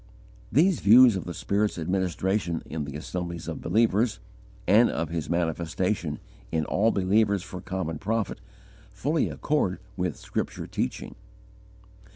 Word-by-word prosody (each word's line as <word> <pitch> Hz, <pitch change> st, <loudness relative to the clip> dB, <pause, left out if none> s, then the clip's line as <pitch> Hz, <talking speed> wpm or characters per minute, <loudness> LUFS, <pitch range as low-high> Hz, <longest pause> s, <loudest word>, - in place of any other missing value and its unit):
These 165 Hz, -, +4 dB
views 120 Hz, +2 st, +7 dB
of 95 Hz, -, -4 dB
the 90 Hz, -, -5 dB
Spirit's 105 Hz, 0 st, 0 dB
administration 90 Hz, +1 st, -1 dB
in 80 Hz, -2 st, -4 dB
the 70 Hz, 0 st, -7 dB
assemblies 85 Hz, +2 st, -5 dB
of 80 Hz, -, -5 dB
believers, 110 Hz, +4 st, +2 dB, 0.5 s
and 110 Hz, +6 st, +5 dB
of 80 Hz, -1 st, -2 dB
His 80 Hz, -2 st, -3 dB
manifestation 85 Hz, 0 st, -1 dB, 0.3 s
in 80 Hz, -2 st, 0 dB
all 110 Hz, +8 st, +2 dB
believers 100 Hz, 0 st, +2 dB
for 90 Hz, -2 st, -8 dB
common 90 Hz, -4 st, -4 dB
profit, 110 Hz, 0 st, -2 dB, 0.5 s
fully 150 Hz, +4 st, 0 dB
accord 145 Hz, -12 st, 0 dB, 0.2 s
with -, -, -1 dB
scripture -, -, -4 dB
teaching. -, -, -3 dB
95 Hz, 130 wpm, -27 LUFS, 85-110 Hz, 0.5 s, views